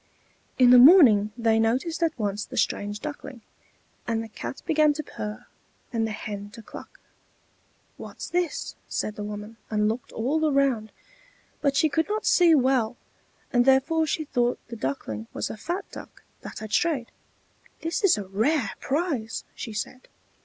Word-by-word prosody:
In 250 -1 +6
the 250 - +9
morning 245 - +7
they 225 -1 +2
noticed 255 +10 0
at 330 -3 +1
once 205 -2 -2
the - - -9
strange 205 +1 -1
Duckling, 280 -5 -7 0.6
and 225 -1 -1
the - - -8
Cat 240 - -7
began 305 -1 +3
to 310 +1 -5
purr 210 -5 -7 0.5
and 225 -1 0
the - - -4
Hen 205 -1 -6
to 230 - -11
cluck. - - -12 1.0
"What's - - -8
this?" 350 -3 -2
said 215 - -2
the 210 - -5
woman, 210 +2 -7
and 210 -1 +1
looked 225 +3 -3
all 305 +7 0
around; 265 -6 +1 0.7
but 280 -2 +1
she 315 - +4
could 320 +5 0
not 430 +1 -2
see 340 -3 +5
well, 255 -4 +2 0.6
and 245 -1 +5
therefore 275 +5 +3
she 310 +1 -1
thought 245 -3 0
the 235 - -6
Duckling 115 - -4
was - - -3
a - - -6
fat 350 - -4
duck - - -11 0.2
that - - -9
had 215 -1 -7
strayed. 280 -4 +1 0.7
"This 330 +5 -2
is 385 - +5
a 205 - -4
rare 220 +6 0
prize!" 275 -7 -2
she 225 - -7
said. 215 +4 -6
245 Hz, 165 wpm, -26 LUFS, 215-305 Hz, 1.0 s, the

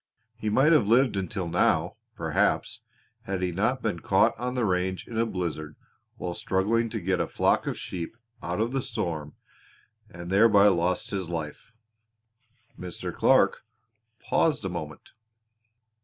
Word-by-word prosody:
He 110 -1 -3
might 135 +9 +4
have 150 -11 +4
lived 120 +1 +4
until 95 -1 -3
now, 85 - +1 0.2
perhaps, - - 0 0.5
had 95 -1 -3
he 90 - 0
not 110 +9 0
been 105 -6 -1
caught - - +3
on 125 +1 -3
the 125 -3 +1
range 95 -1 -1
in 115 - -8
a 115 +1 +1
blizzard 80 -6 -4 0.4
while 90 - -4
struggling 110 +7 0
to - - -3
get 95 +1 0
a - - 0
flock - - +1
of - - -2
sheep 90 +5 -6 0.2
out 90 +3 -3
of 115 +2 0
the 135 0 -1
storm 85 - -4 0.7
and 85 +1 -8
thereby 105 0 +6
lost 90 0 0
his 95 -4 -3
life." 80 +2 -6 1.1
Mr. 90 -1 -6
Clark - - +3 0.6
paused - - +1
a - - -1
moment. - - -7
95 Hz, 150 wpm, -27 LUFS, 85-115 Hz, 1.1 s, thereby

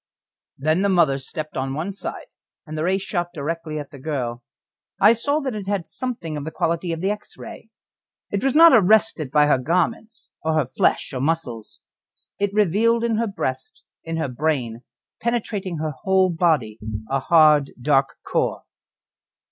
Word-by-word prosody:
Then 155 +6 +1
the 200 - +2
mother 165 -7 +3
stepped 155 +3 -7
on 135 +1 -2
one 165 +6 -3
side, 195 - -7 0.4
and 155 -1 -7
the 155 - -2
ray 185 +3 +2
shot 180 -2 -2
directly 155 +1 -4
at 145 -2 -7
the 140 - -11
girl. 130 -5 -3 0.6
I 210 +3 +7
saw 285 +6 0
that 265 -3 -3
it 205 -2 -6
had 200 -4 -1
something 230 -12 -5
of 145 - -4
the 160 - -4
quality 170 +1 -1
of 165 0 -4
the 195 +2 +1
X 210 - -8
ray. 230 -1 -10 0.6
It 200 - -1
was 270 0 +1
not 330 0 +8
arrested 215 - +4
by 150 +2 +4
her 145 -3 +3
garments, 180 - -2
or 160 0 0
her 155 -3 +2
flesh 130 +2 0
or 130 - -3
muscles. 135 -8 -3 0.6
It 200 -1 0
revealed 215 +4 +2
in 230 -2 +1
her 230 +1 0
breast, 130 -10 -4 0.2
in 165 0 -4
her 160 - -1
brain 125 -4 -2 0.4
penetrating 210 -6 -2
her 155 0 -2
whole 190 -1 +3
body 155 -11 +1 0.3
a 135 +3 0
hard, 150 -1 +5
dark 135 +1 +2
core. - - -1
165 Hz, 170 wpm, -22 LUFS, 145-200 Hz, 0.6 s, not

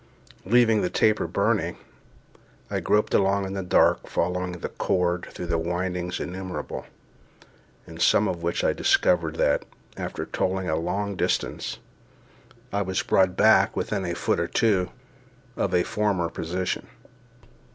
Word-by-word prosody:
Leaving 115 0 +4
the 90 - 0
taper 110 +3 +2
burning, - - 0 0.9
I - - 0
groped 105 0 +1
along 100 0 +2
in 95 - -5
the 100 - -2
dark, 90 - +3
following 90 +1 -1
the 90 - -5
cord 90 -1 0
through 85 -1 -3
windings 90 +1 -2
innumerable, 90 +1 -5 1.0
in - - -11
some - - +4
of 85 - -3
which 85 0 -1
I - - +3
discovered 80 -3 +2
that, 70 - +2 0.3
after - - -4
toiling 95 0 -1
a 80 - +1
long 100 +5 -2
distance, - - -1 1.0
I 100 - +1
was 95 -1 -1
brought 95 -1 +2
back 110 -2 +5
within 100 -2 -1
a 85 -1 -2
foot - - 0
or 85 - 0
two 95 -3 +2 0.7
of - - -1
a 90 - +3
former 100 -5 0
position. 90 +3 -3
90 Hz, 140 wpm, -25 LUFS, 90-100 Hz, 1.0 s, back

